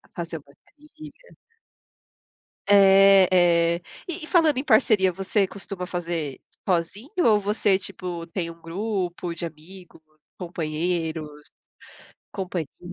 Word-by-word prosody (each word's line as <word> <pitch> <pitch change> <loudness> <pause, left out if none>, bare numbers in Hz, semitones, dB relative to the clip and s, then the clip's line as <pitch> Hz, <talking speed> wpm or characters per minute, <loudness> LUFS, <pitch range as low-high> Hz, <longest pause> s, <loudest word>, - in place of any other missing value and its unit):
Fazer 165 -1 -5
uma 140 0 -22
trilha. 305 - -16 1.3
É 195 -1 +7 0.5
é, 175 - -15 0.3
e 345 -1 -6
falando 320 -6 +3
em 260 - -1
parceria 215 -7 +4
você 195 +2 0
costuma 195 -1 -7
fazer 170 -6 -4 0.3
sozinho 185 - -1 0.2
ou 215 -2 +5
você 205 -1 +1
tipo 175 -3 -7
tem 170 0 -4
um 165 - -17
grupo 180 -1 -3
de 170 +1 -5
amigo, 165 +2 -12 0.4
companheiros, 160 -3 -3 0.9
companhias? 180 -6 -5
185 Hz, 105 wpm, -24 LUFS, 170-205 Hz, 1.3 s, É